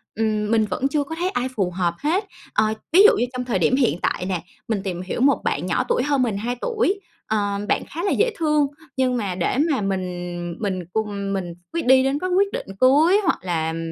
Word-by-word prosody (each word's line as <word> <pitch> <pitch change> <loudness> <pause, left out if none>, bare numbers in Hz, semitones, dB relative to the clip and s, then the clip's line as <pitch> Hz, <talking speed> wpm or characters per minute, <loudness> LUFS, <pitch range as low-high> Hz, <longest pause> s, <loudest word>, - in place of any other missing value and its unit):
ừm, 215 -1 0
mình 225 -1 +3
vẫn 210 +7 -1
chưa 290 0 0
có 320 +3 -6
thấy 350 +3 -1
ai 255 -10 -1
phù 185 -4 0
hợp 175 -1 0
hết. 350 +8 0 0.3
Ờ, 215 +1 +2 0.2
ví 385 +4 +8
dụ 435 - +7
như 240 - +2
trong 250 0 -3
thời 230 -7 0
điểm 210 +9 +3
hiện 250 -10 +1
tại 180 - -1
nè, 180 -3 -2 0.2
mình 215 -4 -1
tìm 180 -3 -3
hiểu 185 +6 -4
một 280 +1 +4
bạn - - -1
nhỏ - - +1
tuổi 485 - +2
hơn 285 -2 +1
mình 220 -5 -1
2 240 +4 -2
tuổi. 435 -4 0 0.3
Ờ, 205 -2 0
bạn - - +2
khá 335 +4 -5
là 400 - +1
dễ 470 +3 +2
thương 300 -3 +2 0.3
nhưng 255 -1 +2
mà 200 -6 -2
để 185 +7 0
mà 265 - 0
mình 175 -3 -3
mình 185 -5 -2
cùng 200 -2 -2
mình 180 -3 -3 0.2
quyết 335 -4 -2
đi 260 0 +6
đến 270 +2 0
có 370 - -2
quyết 395 +2 +2
định - - -4
cưới 305 +10 +5
hoặc 340 - +2
là, 165 -3 -1
ừm, 165 - -4
225 Hz, 235 wpm, -22 LUFS, 190-295 Hz, 0.3 s, ví